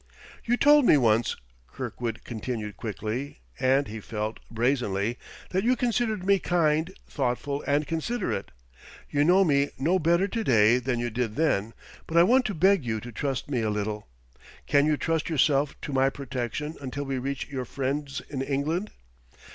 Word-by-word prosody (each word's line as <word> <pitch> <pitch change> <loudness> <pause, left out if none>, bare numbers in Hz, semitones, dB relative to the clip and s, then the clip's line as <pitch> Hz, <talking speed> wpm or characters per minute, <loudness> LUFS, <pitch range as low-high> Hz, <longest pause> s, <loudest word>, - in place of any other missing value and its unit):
"You 240 +1 +1
told 295 +2 +6
me 150 - +6
once," 115 -3 +2 0.3
Kirkwood 115 - -5
continued 110 -2 -5
quickly, 110 +5 -4 0.2
and, 135 +2 +3
he 110 +1 -6
felt, 110 +1 -4
brazenly, 115 -3 0 0.3
"that 190 +1 0
you 250 +3 +3
considered 235 -5 0
me 200 0 +4
kind, 160 -1 +1 0.2
thoughtful 140 +1 -2
and 145 +1 +2
considerate. 165 - -2 0.6
You 145 0 +3
know 180 +5 +5
me 140 -4 +2
no 170 +8 +2
better 170 +4 +3
to 225 +3 -2
day 115 - +4
than 125 -1 -1
you 120 0 -2
did 115 -1 -2
then, 115 -8 0 0.3
but 165 - -1
I 170 - +8
want 255 +7 +4
to 205 - -2
beg 190 0 +4
you 110 -2 -2
to 120 +3 -9
trust 135 +2 -3
me 130 -5 -1
a 110 - 0
little. 105 0 -3 0.6
Can 145 +1 +3
you 155 -1 +2
trust 165 +2 -1
yourself 145 -2 +2
to 145 - -5
my 135 0 +3
protection 140 +3 -4
until 140 +1 -4
we 135 -2 -2
reach 135 +2 -4
your 130 -2 -4
friends 140 +2 -3
in 135 -3 -4
England?" 150 +9 -1
140 Hz, 170 wpm, -27 LUFS, 120-165 Hz, 0.6 s, I